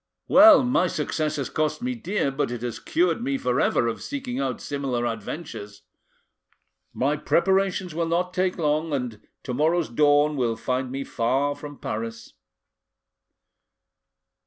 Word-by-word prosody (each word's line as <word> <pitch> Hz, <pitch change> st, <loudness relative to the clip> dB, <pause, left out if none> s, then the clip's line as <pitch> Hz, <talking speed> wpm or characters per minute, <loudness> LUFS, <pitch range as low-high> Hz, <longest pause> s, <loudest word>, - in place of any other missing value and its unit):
Well, 295 Hz, -1 st, +8 dB
my 245 Hz, -7 st, +2 dB
success 155 Hz, -1 st, -2 dB
has 140 Hz, -4 st, -4 dB
cost 155 Hz, -1 st, 0 dB
me 255 Hz, 0 st, -1 dB
dear, 210 Hz, -, -1 dB
but 135 Hz, -1 st, -1 dB
it 120 Hz, -1 st, -5 dB
has 120 Hz, -2 st, -4 dB
cured 340 Hz, -7 st, +1 dB
me 275 Hz, +2 st, 0 dB
for 125 Hz, -, 0 dB
ever -, -, +2 dB
of 115 Hz, -, -3 dB
seeking 265 Hz, -3 st, -4 dB
out 130 Hz, -3 st, -2 dB
similar 135 Hz, -4 st, -2 dB
adventures. 115 Hz, -2 st, -6 dB, 1.1 s
My 140 Hz, +4 st, 0 dB
preparations 190 Hz, +2 st, +1 dB
will 165 Hz, +1 st, -1 dB
not 180 Hz, +2 st, 0 dB
take 185 Hz, 0 st, 0 dB
long, 155 Hz, -1 st, 0 dB
and 125 Hz, -6 st, -3 dB, 0.2 s
to 125 Hz, -, -4 dB
morrow's 160 Hz, +5 st, +1 dB
dawn 145 Hz, +3 st, +3 dB
will 120 Hz, -3 st, 0 dB
find 130 Hz, +2 st, -2 dB
me 135 Hz, +1 st, -3 dB
far 135 Hz, +4 st, 0 dB
from 145 Hz, 0 st, -10 dB
Paris." 115 Hz, +1 st, -5 dB
150 Hz, 145 wpm, -25 LUFS, 125-180 Hz, 1.1 s, Well